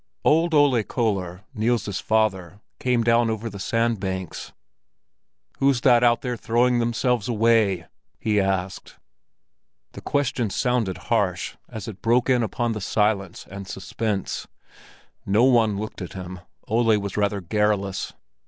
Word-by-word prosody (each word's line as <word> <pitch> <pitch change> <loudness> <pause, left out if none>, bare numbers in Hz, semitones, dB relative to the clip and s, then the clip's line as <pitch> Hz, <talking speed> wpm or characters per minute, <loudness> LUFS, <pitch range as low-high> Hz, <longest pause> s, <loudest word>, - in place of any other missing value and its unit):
Old 165 +1 +3
Ole 140 -5 +4
Köller, 100 -5 -2
Niels's 110 -4 0
father, 100 -4 0 0.2
came 125 -2 +1
down 115 0 +3
over 110 0 -3
the 100 - -8
sandbanks. 95 -5 -2 1.1
"Who's 135 -3 +3
that 125 -2 +5
out 120 -1 +4
there 125 -2 -2
throwing 120 +2 +2
themselves 120 0 0
away?" 110 -6 +2 0.3
he 105 -2 +1
asked. 95 -1 -2 1.0
The - - -10
question 130 -5 0
sounded 120 -5 0 0.2
harsh - - 0
as 110 -3 -7
it 105 -3 -8
broke 120 +3 +2
in 125 -1 +3
upon 120 +1 -1
the 110 -2 -4
silence 100 -2 0
and 100 0 -8
suspense. 100 +2 -3 0.8
No 105 +4 +2
one 115 -5 +4
looked 105 0 -6
at 90 - -6
him—Ole 95 +5 -1
was 100 -2 -4
rather 100 -1 0
garrulous. 100 +1 -1
110 Hz, 130 wpm, -24 LUFS, 100-120 Hz, 1.1 s, that